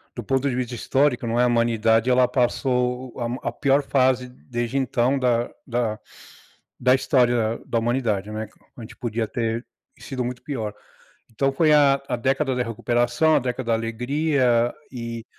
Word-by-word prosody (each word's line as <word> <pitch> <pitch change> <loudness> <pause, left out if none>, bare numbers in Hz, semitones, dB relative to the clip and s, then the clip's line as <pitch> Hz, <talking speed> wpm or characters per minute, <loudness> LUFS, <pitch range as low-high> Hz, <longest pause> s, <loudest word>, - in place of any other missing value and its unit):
do - - -5
ponto 135 +1 0
de 125 - -2
vista 125 -1 -3
histórico, 130 +1 +1
não, 115 +1 0
é - - +5
a - - +3
humanidade, 115 0 +2
ela 125 0 +4
passou 125 0 0
a 120 +2 -3
a - - -6
pior 140 +1 +2
fase 130 -2 +2
desde 120 0 -4
então 130 0 +1
da 120 -2 +1 0.2
da 115 -3 -1 0.8
da 125 +1 +4
história 120 -4 +2
da 115 - 0
humanidade, 115 -4 -1
né, 110 0 -4 0.3
a 120 - -9
gente 110 - -10
podia 115 -1 -2
ter 115 +1 -2 0.3
sido 130 -3 -4
muito 125 +1 -5
pior, 110 -8 -4 0.6
então 135 +5 0
foi 155 +2 +3
a 140 -2 +5
a - - -1
década 135 +2 0
da 125 - 0
recuperação, 120 +6 +1
a - - +4
década 125 -1 -4
da 115 - +2
alegria 120 +1 +1 0.2
e 115 -2 -6
125 Hz, 170 wpm, -23 LUFS, 115-130 Hz, 0.8 s, é